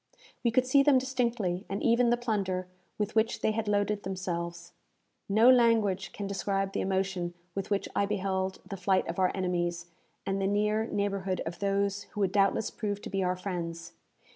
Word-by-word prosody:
We 235 - +3
could 250 +2 +3
see 275 +2 +5
them 275 -1 +5
distinctly, 235 -8 -1
and 195 - -3
even 235 +1 +4
the 240 - +3
plunder 195 -6 -1 0.3
with 210 0 -2
which 220 0 +1
they - - +2
had 220 0 -2
loaded 205 0 +1
themselves. 175 -2 -4 0.6
No 220 +4 +5
language 225 -7 +4
can 205 - -5
describe 195 0 -1
the - - -1
emotion 190 -2 -1 0.2
with 195 +1 -4
which 200 -1 0
I 200 - +2
beheld 190 -2 -2
the 195 - -5
flight 185 +1 +1
of 170 +3 -4
our 185 -1 +3
enemies, 175 -2 -2 0.3
and 195 0 -1
the 195 - +1
near 210 +2 +1
neighbourhood 195 -3 -1
of 170 +1 -5
those 200 0 0
who 210 - -3
would 190 -2 +2
doubtless 200 +1 +2
prove 205 -2 -3
to - - -7
be 195 -1 0
our 180 0 +1
friends. 170 -3 -5
195 Hz, 185 wpm, -29 LUFS, 185-215 Hz, 0.6 s, see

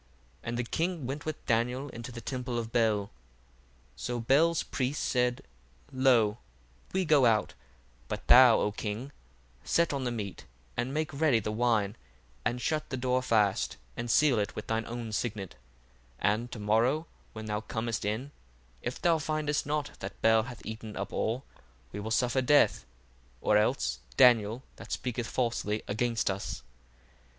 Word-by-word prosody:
And 115 +1 -4
the 120 - 0
king 165 +4 -2
went 140 +4 -4
with 155 - -5
Daniel 125 +5 0
into 120 0 -8
the 120 -1 -7
temple 125 -1 -3
of 115 -1 -3
Bel. 110 -3 +3
1:11 100 - -9 0.9
So 120 0 -3
Bel's 150 +8 +3
priests 135 +2 -2
said, 125 -1 +1 0.5
Lo, 120 -5 +3 0.5
we 190 0 0
go 145 -5 +5
out: 110 -2 +2 0.5
but - - -5
thou, 125 -2 +8
O 105 - +1
king, 110 +6 -4 0.5
set 170 - +2
on 140 -2 -2
the 125 - 0
meat, 105 -5 -5 0.3
and 125 - -1
make 155 +1 -2
ready 140 -3 +3
the 105 0 -3
wine, 110 -2 +1 0.5
and 125 - 0
shut 155 +4 -1
the 130 - -3
door 130 0 +1
fast 105 -6 +1 0.2
and 120 - -4
seal 140 -3 +4
it 100 -1 -2
with 105 - -5
thine 110 0 -1
own 115 -1 -5
signet; 105 -4 -3 0.7
1:12 105 - +5
And 120 +3 -5
to - - -6
morrow 115 +9 +2 0.3
when 110 0 -7
thou 105 0 -2
comest 115 0 -3
in, 110 +7 -2 0.5
if 125 - -4
thou 170 -2 +3
findest 150 -1 -1
not 150 0 -1
that 95 - -7
Bel 110 0 +6
hath 120 +1 -9
eaten 110 -1 -7
up 100 - -4
all, 120 +4 -1 0.5
we 105 - -5
will 105 +2 -4
suffer 125 +3 +2
death: 130 - +4 0.5
or 105 - +2
else 110 +6 +2 0.2
Daniel, 120 -1 +5
that - - -11
speaketh 125 -2 -2
falsely 115 -4 -1
against 115 0 0
us. 95 +1 -5
120 Hz, 165 wpm, -30 LUFS, 110-130 Hz, 0.9 s, thou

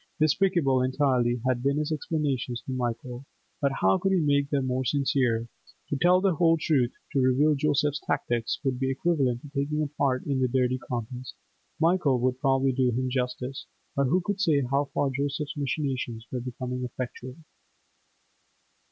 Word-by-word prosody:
Despicable 155 -4 +3
entirely 130 -3 +1
had 125 -2 +1
been 140 +2 +1
his 150 +1 -1
explanations 140 -5 -2
to - - -6
Michael, 125 +1 -4 0.3
but 140 -1 +2
how 95 0 +4
could 195 - +1
he 190 - +3
make 140 -2 +2
them 140 -3 0
more 130 0 -1
sincere? 125 -4 +1 0.4
To - - 0
tell 180 +5 +4
the 190 -1 +2
whole 165 +1 +3
truth, 135 -6 +2 0.2
to 140 - +2
reveal 130 +4 +4
Joseph's 145 0 +1
tactics 120 -4 -1
would 130 -3 -1
be 135 0 0
equivalent 135 -4 0
to 145 - -10
taking 150 +2 -1
a - - 0
part 140 -3 -1
in 140 -2 0
the 130 - +2
dirty 130 0 +1
contest; 125 +1 -6 0.4
Michael 165 -6 +3
would 130 0 0
probably 135 -1 +3
do 130 -1 +2
him 130 +2 -1
justice, 125 +1 -3 0.3
but 140 - +2
who 175 +8 +2
could 200 +2 -2
say 155 -7 +3
how 140 +1 +2
far 140 -1 0
Joseph's 140 +2 -3
machinations 130 -5 -2
were 125 - -3
becoming 125 0 -5
effectual? 125 +1 -6
135 Hz, 170 wpm, -27 LUFS, 125-150 Hz, 0.4 s, how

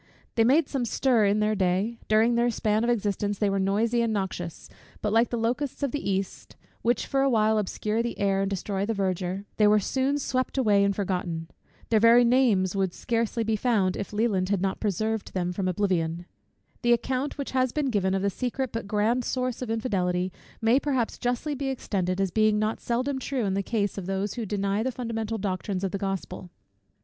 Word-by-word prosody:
They 225 - +3
made 275 +6 +4
some 270 -3 -2
stir 240 -1 +2
in 205 +2 +2
their 210 0 +2
day: 195 +4 0
during 220 +2 +4
their 235 +1 +2
span 215 -1 0
of 235 - +1
existence 205 -3 0
they 205 -1 +1
were 195 - 0
noisy 220 +5 +1
and 230 -1 +1
noxious; 190 -5 -4 0.3
but 210 -1 -1
like 230 +2 +4
the 240 - -2
locusts 250 +5 -2
of 280 - 0
the 290 -6 -3
east, 195 -1 -3 0.3
which 240 +1 +1
for 270 - 0
a 275 - +3
while 220 -2 +3
obscure 210 +2 -1
the 235 0 -3
air, 195 -1 +1
and 195 - 0
destroy 195 0 -2
the 225 +2 -1
verdure, 190 0 -2
they 210 - +5
were 210 0 +5
soon 265 +7 0
swept 255 -1 -2
away 210 -6 +4
and 200 0 +1
forgotten. 180 -4 -2 0.4
Their 225 -2 +4
very 235 +2 +6
names 230 -7 +3
would 195 -1 +1
be - - -18
scarcely 230 -1 -1
found, 205 -5 +1
if 200 - -5
Leland 205 -4 0
had 200 -2 +1
not 190 +1 -1
preserved 215 +1 -2
them 180 -1 -1
from 185 0 -2
oblivion. 175 -3 0 0.6
The 240 -1 +4
account 260 +4 -1
which 280 - -4
has 255 -1 +1
been 285 -2 -1
given, 190 -3 +1
of 190 - -1
the 200 - +1
secret, 255 +3 -3
but 230 -3 -4
grand, 220 +4 +1
source 255 0 -2
of 250 - -4
infidelity, 185 -6 0 0.3
may 230 +4 +5
perhaps 265 -6 -1
justly 245 +5 -1
be 275 0 -3
extended, 190 -8 -2
as 195 -2 +1
being 215 +2 +3
not 215 +1 0
seldom 255 +3 -1
true 260 -3 -2
in 195 - 0
the 200 - 0
case 205 -1 -1
of 185 - -7
those 195 +1 -2
who 235 -3 -4
deny 200 +1 0
the 260 +3 -1
fundamental 225 -3 -3
doctrines 195 -1 -3
of 190 - -1
the 200 - -3
Gospel. 195 -2 -4
215 Hz, 210 wpm, -26 LUFS, 195-240 Hz, 0.6 s, very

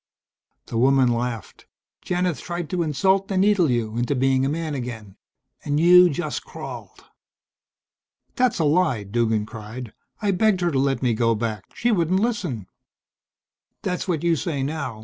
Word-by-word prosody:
The 115 - -3
woman 130 0 +4
laughed. 115 -3 -5 0.4
"Janith 180 -2 -1
tried 175 -3 -5
to 180 - 0
insult 190 +6 +1
and 190 -1 +2
needle 200 -5 +3
you 115 -2 -1
into 120 +4 0
being 130 0 +2
a 135 - +1
man 160 0 -3
again. 115 -7 -6 0.5
And 145 +1 0
you 180 +2 +7
just 170 +3 -3
crawled." - - -9 1.3
"That's 250 -2 +2
a 165 - +1
lie," 145 - +2
Duggan 110 +1 0
cried. 110 +1 -8 0.3
"I 205 -2 +1
begged 195 0 +2
her 175 -1 +1
to 135 - +1
let 135 -2 0
me 120 -2 +2
go 115 +1 +2
back. 110 -3 -3
She 240 - +1
wouldn't 185 -2 +2
listen." 185 - -2 1.2
"That's 180 0 -2
what 170 -4 -1
you 170 -1 +3
say 145 -3 -2
now. 140 -6 -4
145 Hz, 160 wpm, -23 LUFS, 120-180 Hz, 1.3 s, you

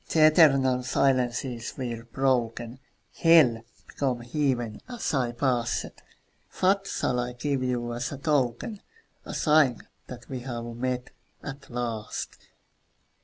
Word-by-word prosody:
The 155 -1 +5
eternal 135 -5 +5
silences 125 -2 0
were 120 -3 -4
broken; 120 -1 -1 0.3
Hell 150 -9 +5 0.2
became 130 -4 -2
Heaven 120 -3 -1
as 240 -8 -3
I 125 -4 +1
passed. 120 -1 -1 0.7
What 195 +1 +3
shall 125 -1 -1
I 125 0 -3
give 135 +2 -2
you 120 -2 -1
as 120 +1 -3
a 140 - -5
token, 145 - -1 0.4
A - - -6
sign 150 -6 +3 0.2
that 120 -1 -10
we 130 -2 -5
have 120 -2 -5
met, 125 +1 -3 0.3
at 140 -1 -8
last? 120 -3 -4
125 Hz, 120 wpm, -27 LUFS, 120-140 Hz, 0.7 s, The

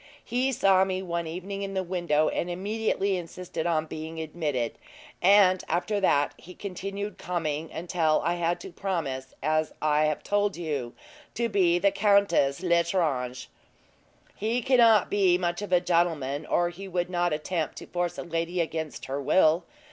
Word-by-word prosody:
He 250 +3 0
saw 195 -6 +4
me 190 0 -2
one 170 -2 -3
evening 185 +4 -5
in 195 -1 -4
the 190 - 0
window, 170 -4 +1
and 175 - -2
immediately 200 +1 -1
insisted 175 -1 -5
on 160 -2 +1
being 160 +1 -7
admitted; 150 -7 -3 0.4
and 185 -1 +5
after 190 +5 0
that, 145 -7 +2
he 180 +1 -13
continued 200 +1 -5
coming 160 -3 -3
until 165 -2 +1
I 170 - +2
had 175 0 -1
to - - -8
promise, 155 -9 -3
as 155 +1 +1
I 150 0 +2
have 155 -1 -1
told 205 -2 0
you, 145 -8 -3 0.4
to 235 0 0
be 180 -4 +3
Countess 200 -7 +3
L'Estrange." 165 -8 0 0.9
"He 225 +4 -1
cannot 235 -5 +5
be 190 -3 +4
much 175 0 -2
of 205 - -6
a 180 - +5
gentleman, 165 -5 0
or 175 0 +2
he 190 +3 -9
would 180 -1 -2
not 175 -1 +1
attempt 155 +1 -2
to - - -8
force 175 -1 -2
a - - -4
lady 170 +1 -2
against 160 -2 -3
her 135 +2 -3
will. 160 +3 +3
175 Hz, 160 wpm, -27 LUFS, 160-195 Hz, 0.9 s, and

